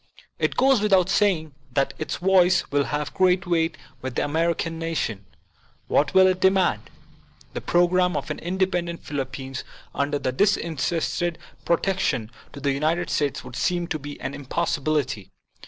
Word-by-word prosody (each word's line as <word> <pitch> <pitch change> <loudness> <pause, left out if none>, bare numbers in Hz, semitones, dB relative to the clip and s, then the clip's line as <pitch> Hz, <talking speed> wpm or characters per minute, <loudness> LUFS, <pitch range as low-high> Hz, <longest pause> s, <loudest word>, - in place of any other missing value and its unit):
It - - 0
goes 265 -3 +4
without 190 -3 +3
saying 175 -8 +2 0.2
that 135 -1 +1
its 155 - -3
voice 185 0 +3
will 140 -1 +2
have 150 -1 -3
great 180 -1 +3
weight 165 -2 +1 0.2
with 130 -2 -5
the - - +1
American 165 +2 0
nation. 120 - -3 0.6
What 145 +4 +1
will 190 0 +8
it 185 -1 +2
demand? 190 0 +2 0.6
The - - -4
pro 175 0 +3
gram 180 0 +2
of - - -4
an - - -4
independent 175 -1 -1
Philippines 135 -1 -4 0.3
under 145 +1 0
the 130 -2 -2
disin 170 -1 +1
terested 170 +3 -1 0.3
protection 170 - 0 0.2
of 140 - -10
the 140 - +2
United 155 +5 0
States 145 -3 0
would 125 -1 -10
seem 175 +6 0
to 155 - -2
be 145 +1 -8
an 140 - -4
impossibility. 145 - -1
165 Hz, 155 wpm, -24 LUFS, 145-180 Hz, 0.6 s, will